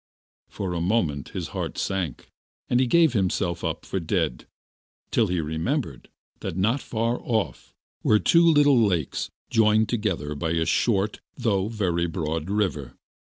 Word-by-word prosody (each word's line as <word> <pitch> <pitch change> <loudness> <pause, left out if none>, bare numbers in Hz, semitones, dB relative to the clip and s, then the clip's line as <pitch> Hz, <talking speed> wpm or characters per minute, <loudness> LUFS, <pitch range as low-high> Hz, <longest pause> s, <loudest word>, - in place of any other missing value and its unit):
For 95 -3 -4
a 85 - -2
moment 85 - 0
his - - -5
heart - - -4
sank, 90 -9 -3 0.4
and 125 - +2
he 130 - +3
gave 165 0 +4
himself 90 -4 0
up 80 -2 -3
for 95 - -2
dead, 80 -6 -1 0.6
till 115 - +3
he 90 -1 -1
remembered 80 - -3 0.3
that, 80 - -5
not 115 +8 +1
far 115 +1 -1
off, 110 -4 -2 0.3
were 105 - +4
two 170 +10 +4
little 145 -5 +5
lakes 90 -9 -1 0.2
joined 110 -1 +4
together 95 -10 -1
by 80 +3 -2
a 80 -1 +1
short 100 +4 +1 0.2
though 100 -4 +1
very 90 -6 0
broad 80 -1 -3
river. 95 - -1
95 Hz, 150 wpm, -25 LUFS, 80-115 Hz, 0.6 s, little